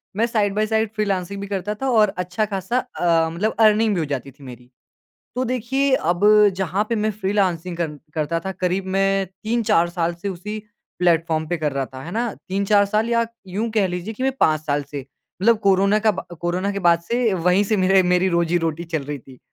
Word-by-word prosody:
मैं 225 Hz, -, +2 dB
side 210 Hz, -4 st, 0 dB
by 215 Hz, 0 st, +2 dB
side 220 Hz, -1 st, +1 dB
freelancing 200 Hz, -2 st, -2 dB
भी 200 Hz, -, -5 dB
करता 200 Hz, +1 st, -3 dB
था 270 Hz, -, 0 dB
और 215 Hz, -4 st, +3 dB
अच्छा-खासा 190 Hz, +4 st, -2 dB
अ, 170 Hz, -9 st, +1 dB
मतलब 185 Hz, +7 st, -2 dB
अर्निंग 215 Hz, 0 st, +4 dB
भी 175 Hz, -, 0 dB
हो 160 Hz, -, 0 dB
जाती 140 Hz, -1 st, -4 dB
थी 140 Hz, -, -18 dB
मेरी। 125 Hz, -1 st, -11 dB, 0.7 s
तो 255 Hz, -, -1 dB
देखिए 255 Hz, +3 st, 0 dB, 0.2 s
अब 180 Hz, +4 st, -2 dB, 0.3 s
जहाँ 190 Hz, +2 st, 0 dB
पे 235 Hz, -, 0 dB
मैं 215 Hz, -, +2 dB
फ़्रीलॉन्सिंग 190 Hz, -4 st, -1 dB
कर 160 Hz, -3 st, -3 dB, 0.2 s
करता 160 Hz, +2 st, -1 dB
था 190 Hz, -, -2 dB
करीब 185 Hz, +1 st, -2 dB
मैं 195 Hz, 0 st, +2 dB
3-4 195 Hz, -2 st, 0 dB
साल 170 Hz, -1 st, -1 dB
से 200 Hz, -, -2 dB
उसी 200 Hz, +4 st, -5 dB, 0.4 s
प्लेटफ़ॉर्म 165 Hz, -2 st, +1 dB
पे 175 Hz, -, 0 dB
कर 150 Hz, -2 st, -2 dB
रहा 135 Hz, -1 st, -2 dB
था, 130 Hz, 0 st, -10 dB
है 165 Hz, -, -7 dB
ना? 235 Hz, 0 st, -1 dB, 0.2 s
3-4 200 Hz, +2 st, +3 dB
साल 215 Hz, +3 st, 0 dB
या 230 Hz, 0 st, +2 dB, 0.3 s
यूँ 225 Hz, +4 st, -1 dB
कह 200 Hz, -3 st, +4 dB
लीजिए 180 Hz, +5 st, -5 dB
कि 255 Hz, -, -6 dB
मैं 265 Hz, 0 st, +1 dB
5 155 Hz, -1 st, +3 dB
साल 145 Hz, -1 st, 0 dB
से 145 Hz, -, -4 dB, 0.4 s
मतलब 230 Hz, 0 st, +4 dB
कोरोना 200 Hz, 0 st, +3 dB
का 215 Hz, 0 st, +3 dB
ब -, -, -11 dB, 0.2 s
कोरोना 180 Hz, +3 st, -1 dB
के 200 Hz, -, -3 dB
बाद 170 Hz, -, +2 dB
से 235 Hz, +3 st, 0 dB
वहीं 180 Hz, +3 st, +2 dB
से 215 Hz, +2 st, 0 dB
मेरे 190 Hz, 0 st, +4 dB
मेरी 180 Hz, +1 st, +2 dB
रोज़ी-रोटी 170 Hz, -1 st, 0 dB
चल 160 Hz, -3 st, -3 dB
रही 145 Hz, 0 st, -5 dB
थी। 130 Hz, 0 st, -16 dB
190 Hz, 210 wpm, -21 LUFS, 170-215 Hz, 0.7 s, अर्निंग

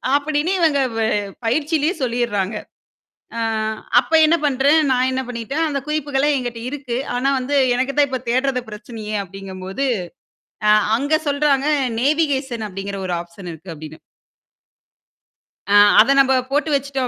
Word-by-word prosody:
அப்படின்னு 295 Hz, +3 st, 0 dB
இவங்க 310 Hz, -5 st, +3 dB, 0.2 s
வ -, -, -1 dB, 0.5 s
பயிற்சியிலேயே 300 Hz, +6 st, +1 dB
சொல்லிர்றாங்க. 230 Hz, -5 st, -1 dB, 0.8 s
ஆ, -, -, -2 dB, 0.6 s
அப்ப 325 Hz, -, -4 dB
என்ன 325 Hz, +2 st, +4 dB
பண்றேன், 285 Hz, +3 st, +3 dB
நான் 255 Hz, 0 st, +2 dB
என்ன 260 Hz, 0 st, -1 dB
பண்ணிட்டேன், 250 Hz, +7 st, -2 dB
அந்த 280 Hz, -2 st, -2 dB
குறிப்புகள 290 Hz, -2 st, 0 dB
என்கிட்ட 245 Hz, -2 st, -4 dB
இருக்கு. 265 Hz, -4 st, -4 dB, 0.2 s
ஆனா, 260 Hz, +3 st, +1 dB
வந்து 270 Hz, +3 st, -2 dB, 0.2 s
எனக்குத்தான் 275 Hz, +3 st, +1 dB
இப்ப 260 Hz, -1 st, -2 dB
தேட்றது 255 Hz, +1 st, +1 dB
பிரச்சனையே 215 Hz, 0 st, -7 dB
அப்படிங்கும்போது, 195 Hz, +5 st, -6 dB, 0.8 s
ஆ, -, -, +6 dB, 0.3 s
அங்க 285 Hz, +5 st, 0 dB
சொல்றாங்க, 285 Hz, -1 st, +1 dB, 0.3 s
"நேவிகேஷன் 270 Hz, -5 st, 0 dB
அப்படிங்கிற 195 Hz, +1 st, -6 dB
ஒரு 180 Hz, -, -3 dB
ஆப்ஷன் 175 Hz, +1 st, -10 dB
இருக்கு" 165 Hz, +3 st, -11 dB
அப்படின்னு 155 Hz, +1 st, -10 dB, 1.8 s
ஆ, -, -, +6 dB, 0.2 s
அத 255 Hz, +6 st, +6 dB
நம்ப 265 Hz, -1 st, +4 dB, 0.2 s
போட்டு 290 Hz, +3 st, 0 dB
வெச்சுட்டோம். 275 Hz, -2 st, -1 dB
260 Hz, 130 wpm, -20 LUFS, 220-285 Hz, 1.8 s, ஆ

